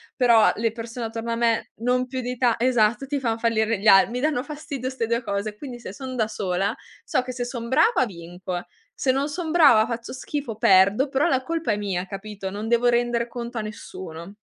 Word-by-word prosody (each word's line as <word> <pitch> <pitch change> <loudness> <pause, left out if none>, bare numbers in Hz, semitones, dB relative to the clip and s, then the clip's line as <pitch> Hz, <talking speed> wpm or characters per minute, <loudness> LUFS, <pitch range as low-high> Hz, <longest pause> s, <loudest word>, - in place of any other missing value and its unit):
però 235 -4 +5
le 225 0 0
persone 230 +1 -6
attorno 225 +1 -5
a - - 0
me 230 -1 0
non 250 +2 +1
più 260 0 -4
di 250 0 -4
ta 240 -2 +3
esatto, 240 0 +2
ti 285 0 -1
fan 230 -3 -1
fallire 225 -2 +1
gli 215 - -2
al 195 +2 +7
mi 245 +1 -3
danno 290 -3 0
fastidio 290 -4 -5
'ste 245 -4 -3
2 235 +1 0
cose. 205 +1 -3
Quindi 245 -2 -8
se 200 - -8
son 260 +2 -7
da 220 -3 +1
sola, 195 -1 -1 0.3
so - - 0
che 255 - -5
se 245 0 -3
son 235 -2 -5
brava 265 - +4
vinco, 175 -1 -6 0.3
se 260 - +1
non 275 +3 0
son 330 +1 -4
brava, 280 -10 +6
faccio 235 0 -5
schifo, 270 -2 -4
perdo, 200 +8 +5
però 270 +2 +2
la 260 -1 +1
colpa 330 -6 -1
è 205 - 0
mia, 190 -3 -2
capito? 195 0 -6
Non 210 +2 -5
devo 240 +1 +3
render 240 0 +1
conto 235 0 -6
a - - -1
nessuno. 190 -4 -8
235 Hz, 215 wpm, -24 LUFS, 215-255 Hz, 0.3 s, al